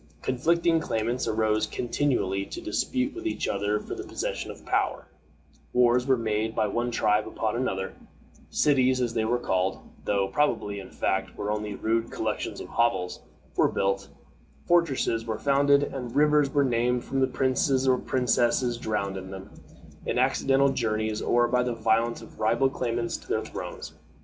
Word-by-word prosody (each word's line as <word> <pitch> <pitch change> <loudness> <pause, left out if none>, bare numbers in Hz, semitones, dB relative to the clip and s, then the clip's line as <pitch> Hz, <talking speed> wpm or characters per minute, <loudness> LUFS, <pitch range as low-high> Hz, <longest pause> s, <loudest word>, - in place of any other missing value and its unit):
Conflicting 165 +6 +2
claimants 120 -3 -1
arose 110 0 +1
continually 120 -6 0
to - - -7
dispute 255 - -1
with 350 -1 -5
each 330 - -2
other 105 +1 0
for - - -7
the - - -5
possession - - -4
of - - -10
power; - - 0 0.7
wars 125 +1 +4
were 130 -1 +4
made 110 -1 -1
by 110 - +2
one 120 +4 -1
tribe 105 -2 +1
upon 110 0 -2
another; 95 -6 -2 0.6
cities, 130 -3 +3
as 120 -2 0
they 110 - 0
were 120 +2 +1
called 95 -5 0 0.3
though 100 -1 +1
probably, 105 -3 0
in 95 - -9
fact, - - -1
they - - -18
were 105 0 -3
only 105 -1 -3
rude 115 +2 0
collections - - -3
of - - -7
hovels 95 -7 0 0.4
were - - +4
built, 100 0 -1 0.6
fortresses 135 -9 +2
were 110 -1 -2
founded, 140 +3 +3
and 130 -3 -5
rivers 150 -1 +4
were 145 -2 +3
named 120 0 +1
from 135 0 0
princes 130 0 +1
or 130 -1 +4
princesses 120 -1 +1
drowned 100 -4 -2
in 95 0 -7
them, 95 0 -9 0.6
in - - 0
accidental 135 +1 +3
journeys, 110 -3 -1
or 120 0 +3
by 125 +1 +2
the 125 -1 -1
violence 115 +1 +1
of - - -15
rival 120 +5 +2
claimants 120 -2 -2
to - - -17
their - - -1
thrones. - - -7
120 Hz, 165 wpm, -27 LUFS, 105-130 Hz, 0.7 s, wars